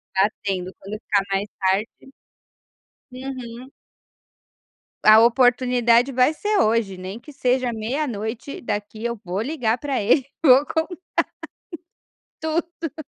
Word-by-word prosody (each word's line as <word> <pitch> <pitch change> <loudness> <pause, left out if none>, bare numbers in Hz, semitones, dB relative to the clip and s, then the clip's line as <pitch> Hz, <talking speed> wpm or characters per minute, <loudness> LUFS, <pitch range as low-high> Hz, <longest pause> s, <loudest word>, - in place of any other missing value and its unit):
Está 195 +3 +4
tendo, 185 -2 -3
quando 205 +2 -7
ficar 200 -4 +1
mais 195 +1 0
tarde. 195 +7 -1 1.0
Uhum. 255 -1 -8 1.3
A 215 +1 +8
oportunidade 245 +1 +4
vai 255 +4 +3
ser 415 +5 -1
hoje 215 -4 +1
nem 185 +4 -7
que 295 +5 -13
seja 255 -2 0
meia 245 +7 -2
noite 220 +4 -5
daqui 215 +1 -4
eu 235 -2 -2
vou 185 +2 -3
ligar 245 -3 0
para 275 -5 -2
ele, 245 +6 +3 0.2
vou 270 0 +7
contar 325 +3 -2 1.5
tudo. 325 -1 -3
240 Hz, 120 wpm, -22 LUFS, 215-270 Hz, 1.5 s, A